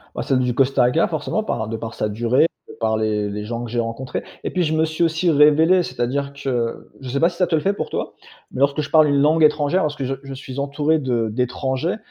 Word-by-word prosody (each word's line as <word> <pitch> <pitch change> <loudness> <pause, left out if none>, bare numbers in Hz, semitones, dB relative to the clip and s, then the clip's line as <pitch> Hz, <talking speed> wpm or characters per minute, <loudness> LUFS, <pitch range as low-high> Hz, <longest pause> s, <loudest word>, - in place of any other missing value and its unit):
Ah, - - -2
celle 130 -1 +1
du 125 -1 0
Costa 135 0 +2
Rica 125 +7 +2
forcément, 170 +6 -2
par 110 - -3
de 115 - -3
par 115 +1 -7
sa 105 - -2
durée, 120 +7 +2 0.3
par 110 -1 +1
les 105 -1 -1
les 105 +1 -5
gens 115 +2 -4
que 120 - -7
j'ai 120 0 0
rencontrés 115 +3 -4 0.2
et - - -2
puis 180 - 0
je 160 -2 0
me 160 0 +2
suis 160 +1 -2
aussi 165 +1 +1
révélé. 155 +4 +5
C'est-à-dire 140 0 -2
que, 125 -4 -3
je 130 - -8
sais 140 +3 -1
pas 170 - +4
si 175 - -13
ça 180 - +3
te 170 - -2
le 155 - +2
fait 195 - +2
pour 205 - -4
toi, - - -4 0.4
mais - - -6
lorsque 140 +2 +2
je 140 - -7
parle 155 -1 +5
une 140 -1 +2
langue 155 +2 +3
étrangère, 150 +4 +3
lorsque 150 -2 -2
je 135 +1 -1
je 135 -1 -8
suis 130 0 -8
entouré 145 +3 +1
de 120 -5 -1
d'étrangers, 130 - -1
140 Hz, 255 wpm, -21 LUFS, 120-155 Hz, 0.4 s, révélé